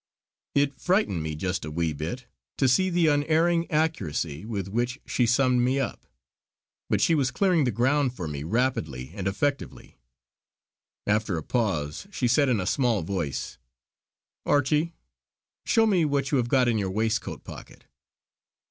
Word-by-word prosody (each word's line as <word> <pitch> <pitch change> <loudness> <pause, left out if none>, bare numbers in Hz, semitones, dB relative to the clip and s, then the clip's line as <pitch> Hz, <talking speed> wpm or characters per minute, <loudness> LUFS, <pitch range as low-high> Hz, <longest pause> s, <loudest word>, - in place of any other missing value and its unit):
It 140 -1 +1
frightened 180 - +1
me 80 0 -4
just 90 +4 -2
a 75 - -5
wee 80 0 -1
bit 85 - -5 0.3
to 135 - +3
see 185 +9 +3
the 175 -1 +2
unerring 160 +3 +2
accuracy 95 - -1
with 100 -5 -3
which 120 +6 -2
she 120 - +1
summed 125 0 +3
me 130 +3 +1
up; 135 - -4 0.8
but - - +1
she 165 - +4
was 140 -5 +2
clearing 180 -2 +2
the 125 - +1
ground 130 +4 +1
for 90 -7 -5
me 75 -2 -5
rapidly 100 - -1
and 95 -2 -4
effectively. 140 - -3 1.1
After 105 -3 +1
a 80 - -4
pause 95 - -2
she 135 -11 -1
said 135 +3 +3
in 120 -5 +2
a 90 - -2
small 115 -3 +1
voice: 85 -6 -4 0.8
"Archie 150 +4 +1 0.7
show 225 - +4
me 190 -6 +3
what 140 -2 0
you 140 - +3
have 120 -1 -1
got 130 -1 +3
in 115 -2 +2
your 95 -2 -1
waistcoat 110 +2 -2
pocket." - - -11
125 Hz, 155 wpm, -26 LUFS, 95-145 Hz, 1.1 s, she